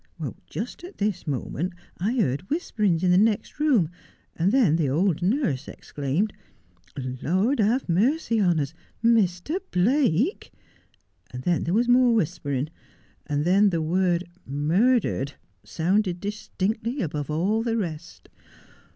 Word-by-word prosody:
Just -, -, -6 dB
at 365 Hz, +3 st, -10 dB
this 200 Hz, -4 st, -2 dB
moment 150 Hz, +5 st, -3 dB, 0.3 s
I 205 Hz, +7 st, 0 dB
heard 165 Hz, -, 0 dB
whisperings 210 Hz, -, 0 dB
in 180 Hz, -, +4 dB
the 180 Hz, -, +5 dB
next 215 Hz, +5 st, +1 dB
room, 245 Hz, -, +3 dB, 0.4 s
and 175 Hz, +4 st, +2 dB
then 225 Hz, -, +4 dB
the 160 Hz, -5 st, +1 dB
old 170 Hz, +4 st, +1 dB
nurse 180 Hz, -, 0 dB
exclaimed, 150 Hz, +9 st, -2 dB, 0.4 s
" 125 Hz, +9 st, -7 dB
Lord 200 Hz, -, +1 dB
have 225 Hz, +5 st, +2 dB
mercy 230 Hz, -, +2 dB
on 175 Hz, -5 st, +3 dB
us, 140 Hz, +1 st, -2 dB, 0.3 s
Mr. 225 Hz, -, +2 dB
Blake! 245 Hz, -, +1 dB, 0.4 s
" -, -, -35 dB
and 125 Hz, +1 st, -7 dB
then 175 Hz, +2 st, +1 dB
there 170 Hz, +4 st, 0 dB
was 240 Hz, +2 st, +2 dB
more 245 Hz, -1 st, +5 dB
whispering, 150 Hz, -, -1 dB, 0.6 s
and 145 Hz, 0 st, -1 dB
then 200 Hz, +4 st, +5 dB
the 170 Hz, -3 st, -1 dB
word 175 Hz, +2 st, +1 dB
" -, -, -33 dB, 0.2 s
murdered 195 Hz, -, +2 dB, 0.2 s
" -, -, -43 dB
sounded 180 Hz, +2 st, 0 dB
distinctly 210 Hz, +4 st, -3 dB
above 150 Hz, -3 st, -4 dB
all 190 Hz, +9 st, +1 dB
the 230 Hz, 0 st, -1 dB
rest. 165 Hz, -8 st, -5 dB
185 Hz, 140 wpm, -25 LUFS, 160-225 Hz, 0.6 s, the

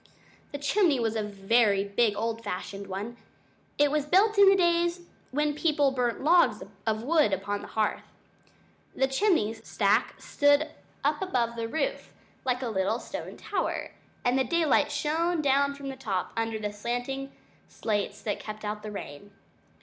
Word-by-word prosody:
The 285 Hz, -, -4 dB
chimney 290 Hz, 0 st, +2 dB
was 225 Hz, -1 st, 0 dB
a 220 Hz, -, 0 dB
very 205 Hz, 0 st, +2 dB
big 205 Hz, +1 st, +1 dB
old 225 Hz, +2 st, -2 dB
fashioned 200 Hz, 0 st, -5 dB
one. 205 Hz, +5 st, -5 dB, 0.6 s
It 290 Hz, -1 st, +4 dB
was 300 Hz, -1 st, 0 dB
built 410 Hz, +7 st, +4 dB
in 400 Hz, -1 st, +9 dB
the 390 Hz, -, +6 dB
days 345 Hz, -1 st, +2 dB, 0.3 s
when 295 Hz, +2 st, 0 dB
people 295 Hz, -2 st, +2 dB
burnt 250 Hz, -1 st, -1 dB
logs 340 Hz, +3 st, +4 dB, 0.2 s
of 220 Hz, 0 st, 0 dB
wood 300 Hz, -4 st, +3 dB
upon 205 Hz, +1 st, -2 dB
the -, -, -9 dB
hearth. 215 Hz, -1 st, -1 dB, 0.9 s
The 265 Hz, -, +3 dB
chimney 270 Hz, -, +2 dB
stack 220 Hz, 0 st, 0 dB
stood 285 Hz, +1 st, +3 dB, 0.3 s
up -, -, +1 dB
above 240 Hz, -11 st, 0 dB
the 230 Hz, -1 st, -3 dB
roof 275 Hz, +4 st, -3 dB, 0.3 s
like 255 Hz, 0 st, 0 dB
a -, -, -1 dB
little 195 Hz, +1 st, 0 dB
stone -, -, -7 dB
tower, -, -, -3 dB, 0.3 s
and 245 Hz, +2 st, +3 dB
the -, -, +3 dB
daylight 315 Hz, -2 st, +2 dB
shone 330 Hz, +3 st, 0 dB
down 280 Hz, -1 st, +2 dB
from 280 Hz, -1 st, -7 dB
the 270 Hz, -, -5 dB
top, 200 Hz, -8 st, -3 dB
under 225 Hz, -1 st, -1 dB
the 210 Hz, -1 st, -4 dB
slanting 245 Hz, +5 st, -3 dB, 0.4 s
slates 205 Hz, -2 st, -3 dB
that 205 Hz, -, -2 dB
kept 215 Hz, 0 st, -7 dB
out 210 Hz, 0 st, -3 dB
the 215 Hz, -, -6 dB
rain. 200 Hz, -3 st, -8 dB
245 Hz, 165 wpm, -28 LUFS, 215-295 Hz, 0.9 s, in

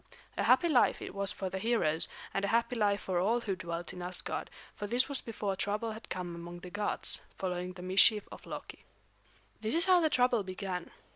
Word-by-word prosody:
A -, -, -1 dB
happy 345 Hz, -, +5 dB
life 275 Hz, -7 st, +4 dB
it -, -, -7 dB
was 200 Hz, 0 st, 0 dB
for 190 Hz, -2 st, -4 dB
the 190 Hz, -, -3 dB
heroes, 190 Hz, -9 st, +2 dB, 0.3 s
and 195 Hz, -, -1 dB
a -, -, +2 dB
happy 235 Hz, +2 st, +1 dB
life 205 Hz, -3 st, +2 dB
for 185 Hz, -2 st, -1 dB
all 225 Hz, +6 st, +2 dB
who 200 Hz, -4 st, -2 dB
dwelt 170 Hz, -1 st, -5 dB
in 180 Hz, -, -7 dB
Asgard; 180 Hz, +1 st, -1 dB, 0.2 s
for 205 Hz, -, -5 dB
this 245 Hz, +4 st, +2 dB
was 280 Hz, -2 st, -3 dB
before 210 Hz, -4 st, -3 dB
trouble 210 Hz, +4 st, -1 dB
had 220 Hz, +1 st, -9 dB
come 180 Hz, -2 st, -4 dB
among 170 Hz, +1 st, -8 dB
the 180 Hz, -, -9 dB
gods, 205 Hz, +1 st, -1 dB, 0.2 s
following 180 Hz, -1 st, -3 dB
the 180 Hz, -1 st, -9 dB
mischief 195 Hz, +3 st, +5 dB
of -, -, -11 dB
Loki. -, -, -8 dB, 0.8 s
This 220 Hz, +6 st, +1 dB
is 335 Hz, -, +4 dB
how 370 Hz, -1 st, +6 dB
the 315 Hz, -, +3 dB
trouble 250 Hz, -4 st, +3 dB
began. 185 Hz, -2 st, -4 dB
200 Hz, 210 wpm, -32 LUFS, 180-230 Hz, 0.8 s, how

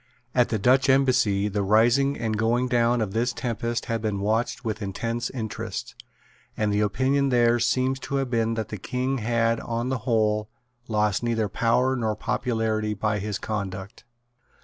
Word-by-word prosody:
At 125 Hz, -1 st, +3 dB
the 110 Hz, -, 0 dB
Dutch 130 Hz, +6 st, +3 dB
Embassy 125 Hz, -7 st, +3 dB
the 105 Hz, 0 st, -1 dB
rising 120 Hz, +7 st, +3 dB
and 110 Hz, -2 st, -2 dB
going 115 Hz, +3 st, +1 dB
down 120 Hz, -1 st, +2 dB
of 100 Hz, -3 st, -2 dB
this 120 Hz, +2 st, 0 dB
tempest 120 Hz, -1 st, -3 dB
had 115 Hz, -2 st, -2 dB
been 105 Hz, -3 st, -1 dB
watched 110 Hz, +5 st, -1 dB
with 110 Hz, 0 st, -3 dB
intense 115 Hz, +4 st, -3 dB
interest; 110 Hz, -5 st, -5 dB, 0.6 s
and 105 Hz, -1 st, 0 dB
the 105 Hz, -, +1 dB
opinion 130 Hz, +7 st, +1 dB
there 120 Hz, -1 st, +3 dB
seems 130 Hz, +2 st, +1 dB
to 140 Hz, -, -4 dB
have 135 Hz, -2 st, -1 dB
been 115 Hz, -1 st, +1 dB
that 110 Hz, -1 st, -3 dB
the 105 Hz, -, -6 dB
King 130 Hz, +6 st, -2 dB
had 115 Hz, 0 st, +1 dB
on 120 Hz, +2 st, -3 dB
the 130 Hz, -2 st, -1 dB
whole 110 Hz, -2 st, +1 dB, 0.4 s
lost 105 Hz, -3 st, +1 dB
neither 115 Hz, -2 st, 0 dB
power 120 Hz, +6 st, +1 dB
nor 110 Hz, -4 st, -1 dB
popularity 110 Hz, -2 st, -1 dB
by 105 Hz, +1 st, -1 dB
his 105 Hz, 0 st, -3 dB
conduct. 100 Hz, -2 st, -5 dB
115 Hz, 170 wpm, -25 LUFS, 105-125 Hz, 0.6 s, At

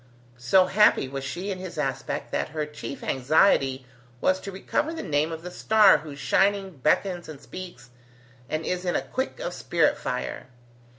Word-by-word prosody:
So 155 Hz, +10 st, +4 dB
happy 190 Hz, -7 st, +4 dB
was 135 Hz, 0 st, -5 dB
she 175 Hz, +8 st, -4 dB
in 185 Hz, -, -4 dB
his 185 Hz, -1 st, -7 dB
aspect, -, -, -3 dB
that -, -, -1 dB
her 155 Hz, 0 st, -3 dB
chief 150 Hz, -2 st, -8 dB
anxiety 135 Hz, -1 st, +2 dB, 0.3 s
was 185 Hz, +7 st, +2 dB
to 195 Hz, -, -6 dB
recover 290 Hz, +11 st, -1 dB
the 320 Hz, -, -5 dB
name 150 Hz, +2 st, 0 dB
of 165 Hz, 0 st, -6 dB
the 180 Hz, -, -7 dB
star 215 Hz, +1 st, +5 dB
whose 150 Hz, -3 st, -9 dB
shining 195 Hz, +2 st, +1 dB
beckons 175 Hz, +5 st, 0 dB
and 150 Hz, -3 st, -9 dB
speaks, 140 Hz, -9 st, -10 dB, 0.6 s
and 155 Hz, +1 st, -2 dB
is 180 Hz, 0 st, -2 dB
in 175 Hz, -1 st, -1 dB
the -, -, 0 dB
quick 260 Hz, -, -4 dB
of -, -, -4 dB
spirit -, -, +1 dB
fire. -, -, -4 dB
175 Hz, 175 wpm, -26 LUFS, 145-195 Hz, 0.6 s, star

